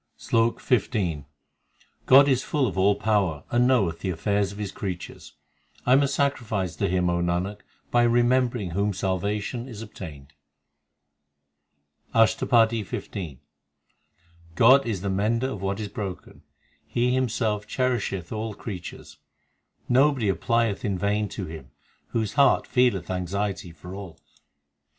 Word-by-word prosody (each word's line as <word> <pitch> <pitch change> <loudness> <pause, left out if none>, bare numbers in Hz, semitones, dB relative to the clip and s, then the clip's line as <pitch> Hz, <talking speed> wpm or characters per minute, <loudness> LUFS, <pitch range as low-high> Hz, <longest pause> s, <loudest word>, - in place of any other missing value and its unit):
SLOK 115 +1 +1
XV 95 - 0 0.8
God 140 +2 +8
is 130 -2 +2
full 145 -4 0
of 100 -8 -3
all 100 +2 +3
power 100 -8 0
and 120 +1 +3
knoweth 100 -11 +2
the 95 - -3
affairs 100 +3 0
l - - -10
of - - -11
His 105 -2 -4
creatures; 95 -4 -7 0.5
I 125 - +4
am 135 - +6
a 140 - +2
sacrifice 120 - -1
to 100 - 0
Him, 90 0 +1
O 85 0 +1
Nanak, 90 +4 -1 0.3
by 120 - +4
remembering 120 -3 +2
whom 100 +4 0
salvation 100 +6 -2
is 115 -4 -8
obtained. 75 -10 -10 1.8
ASHTAPADI 115 0 +4
XV 95 - -7
i 85 -9 -5 1.2
God 130 +6 +6
is 105 -6 -2
the 100 - -2
mender 115 +7 0
of 100 - -6
what 100 +1 -2
is 105 - -3
broken; 100 -2 -7 0.5
He 125 +1 +1
Himself 110 -5 0
cherisheth 120 -9 -1
all 110 -1 -4
creatures. 95 -6 -8 0.7
Nobody 130 -4 +3
applieth 115 +1 0
in 100 -3 -1
vain 105 +2 0
to 95 - -5
Him 80 -5 -9 0.4
Whose 110 -3 -2
heart 140 -2 +4
feeleth 125 -8 +1
anxiety 95 0 -3
for 85 +3 -11
all. 95 -5 -8
105 Hz, 140 wpm, -25 LUFS, 95-120 Hz, 1.8 s, God